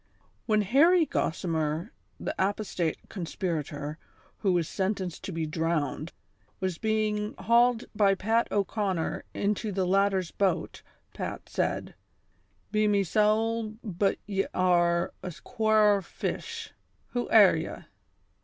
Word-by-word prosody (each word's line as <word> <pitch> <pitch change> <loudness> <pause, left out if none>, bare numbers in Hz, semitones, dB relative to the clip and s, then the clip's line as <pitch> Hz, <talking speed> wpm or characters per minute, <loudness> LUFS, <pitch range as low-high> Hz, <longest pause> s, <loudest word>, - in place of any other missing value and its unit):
jHEN 215 -2 +3
Harry 320 - +5
Gossimer, 165 - -1 0.3
the - - -3
apostate 190 -4 -1
conspirator, 160 -5 -4 0.4
who 195 - +2
was 175 -3 +1
sentenced 190 -3 -2
to - - -4
be 165 -2 -2
drowned, 160 -1 -1 0.5
was 185 -3 -2
being 215 -1 0
hauled 235 +3 +3
by 200 -2 +4
Pat 225 +5 +1
O'Conner 200 -4 -1
into 210 +1 -1
the 190 -1 0
latter's 195 -1 +2
boat, 190 -4 -1 0.3
Pat - - -5
said: - - -2 0.4
" - - -41
Be 215 0 +2
me 200 -1 +3
sowl, 215 +3 +1
but 195 -2 0
ye 195 -1 -1
are 175 -2 +2
a 180 - -5
quare 215 -3 +3
fish; 455 - -5 0.4
who 245 -1 -2
air - - +7
ye - - -4
195 Hz, 120 wpm, -28 LUFS, 175-215 Hz, 0.5 s, air